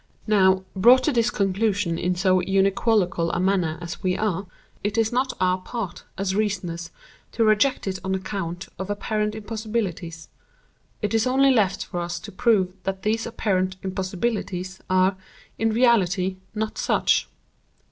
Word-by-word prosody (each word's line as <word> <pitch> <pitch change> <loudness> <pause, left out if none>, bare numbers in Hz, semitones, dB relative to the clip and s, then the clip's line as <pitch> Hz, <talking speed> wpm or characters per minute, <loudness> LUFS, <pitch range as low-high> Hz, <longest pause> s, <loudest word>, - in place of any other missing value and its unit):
Now, 190 -3 +4
brought 245 +7 +6
to 305 - +2
this 235 -2 +2
conclusion 195 -4 0
in 180 +1 0
so 185 0 +3
unequivocal 195 -2 +2
a - - -1
manner 180 -4 +1
as 170 -1 -6
we 185 -2 0
are, 200 -3 -1 0.4
it 205 +1 -1
is 225 -1 +2
not 260 +2 +1
our 185 0 +2
part, 185 -2 -6
as 190 0 -1
reasoners, 180 -5 -2 0.4
to 230 - +2
reject 215 +5 +3
it 190 -1 -3
on 190 0 -1
account 190 -2 -4
of 190 +1 -4
apparent 210 +1 -1
impossibilities. 210 -6 -4 0.8
It 210 - 0
is 225 +2 +2
only 270 +1 +4
left 210 -7 +2
for 175 - -5
us 170 0 -3
to 205 - -9
prove 190 -3 +2
that 190 0 -4
these 220 +2 0
apparent 190 -5 0
'impossibilities' 190 0 -3
are, 185 +1 +3 0.4
in 225 - +2
reality, 195 -6 +2 0.2
not 215 0 -3
such. - - +2
195 Hz, 150 wpm, -24 LUFS, 185-220 Hz, 0.8 s, brought